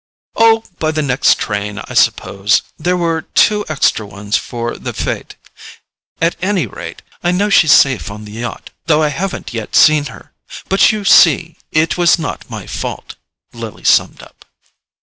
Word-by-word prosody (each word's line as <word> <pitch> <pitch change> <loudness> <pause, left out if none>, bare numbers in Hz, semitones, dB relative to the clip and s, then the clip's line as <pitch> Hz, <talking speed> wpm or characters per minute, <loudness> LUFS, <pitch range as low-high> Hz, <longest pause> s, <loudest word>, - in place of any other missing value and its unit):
"Oh, 225 0 +4 0.2
by 155 - 0
the 155 -1 -1
next 135 0 +2
train, 105 -2 -4
I - - -8
suppose; 100 +2 +1
there 180 +3 -1
were 165 -2 -1
two 210 +4 +1
extra 140 -7 +1
ones 100 +1 -5
for 120 -1 -3
the - - -6
FETE. - - -4 0.8
At 165 +1 +1
any 190 -5 0
rate, 85 -5 -9 0.2
I 175 - +1
know 200 +3 0
she's 160 -6 +5
safe 125 - +4
on 105 +1 -9
the 105 - -11
yacht, 115 +2 -7 0.2
though 155 -1 +3
I 150 - +2
haven't 180 -1 -5
yet 115 -2 -5
seen 155 -1 +5
her; - - -12 0.3
but 195 +3 +4
you 215 -2 -5
see 165 -2 +5 0.2
it 160 +3 +1
was 175 0 +4
not 160 -3 -6
my - - -7
fault," - - -6 0.4
Lily - - -9
summed - - +2
up. - - -18
155 Hz, 170 wpm, -15 LUFS, 115-175 Hz, 0.8 s, she's